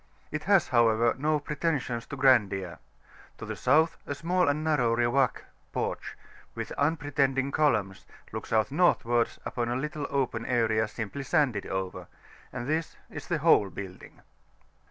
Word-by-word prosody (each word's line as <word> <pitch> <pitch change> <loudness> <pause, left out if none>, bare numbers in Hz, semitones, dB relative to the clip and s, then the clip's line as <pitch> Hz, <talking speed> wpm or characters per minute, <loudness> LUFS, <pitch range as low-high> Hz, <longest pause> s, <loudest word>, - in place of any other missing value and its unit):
It 155 0 -4
has, 195 -3 +4
however, 115 -1 +3
no 150 +3 +1
preten[s]ions 145 -5 -2
to - - -5
grandeur. 105 -10 +2 0.6
To - - -7
the - - -5
South 160 +5 +3
a 140 - -3
small 175 +4 +1
and 145 +2 0
narrow 130 -7 +2
Riwak 120 +2 +1 0.3
(porch), - - -4 0.4
with - - -5
unpretending 140 -3 0
columns, 105 -12 0 0.2
looks 110 - -7
out 110 +3 +2
Northwards 120 -8 +2
upon 120 -1 -2
a 120 - -1
little 150 +2 -3
open 130 -5 -1
area 110 -3 +1
simply 110 +5 -5
sanded 135 - +1
over; 95 -1 -4 0.4
and 120 - -5
this 160 +2 -1 0.2
is - - -8
the 170 - 0
whole 105 -11 +5
building. 95 -2 -10
130 Hz, 145 wpm, -28 LUFS, 115-150 Hz, 0.6 s, whole